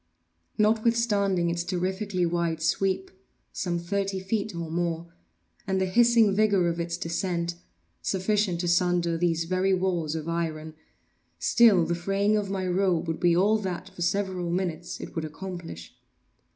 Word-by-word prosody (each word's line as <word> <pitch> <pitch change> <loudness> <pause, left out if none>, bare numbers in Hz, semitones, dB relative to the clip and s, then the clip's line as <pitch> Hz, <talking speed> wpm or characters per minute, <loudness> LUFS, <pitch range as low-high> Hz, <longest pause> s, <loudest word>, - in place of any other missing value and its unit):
Notwithstanding 210 -5 +2
its 170 0 -2
terrifically 185 +1 -1
wide 170 -1 -1
sweep 190 +4 0 0.4
(some 175 -2 -2
thirty 195 +2 -2
feet 200 +1 -2
or 165 -1 -5
more) 170 0 -2 0.5
and 190 0 +1
the 190 - +2
hissing 230 +1 +4
vigor 200 -3 +3
of 170 0 -1
its 170 0 -2
descent, 170 0 -2 0.5
sufficient 190 -2 0
to 175 - -2
sunder 175 -1 +2
these 165 -1 +1
very 185 +3 +1
walls 175 -4 -1
of 160 0 -4
iron, 160 -2 -3 0.6
still 215 -8 +5
the 170 - -1
fraying 195 +4 +1
of 205 -2 -1
my 190 -1 -2
robe 180 -2 +1
would 160 -1 -2
be 175 -2 +3
all 210 +4 +3
that, 185 -2 -4
for 185 -2 -11
several 185 -1 -1
minutes, 175 -1 -3
it - - -8
would 160 - -2
accomplish. 165 - -7
180 Hz, 150 wpm, -27 LUFS, 170-195 Hz, 0.6 s, still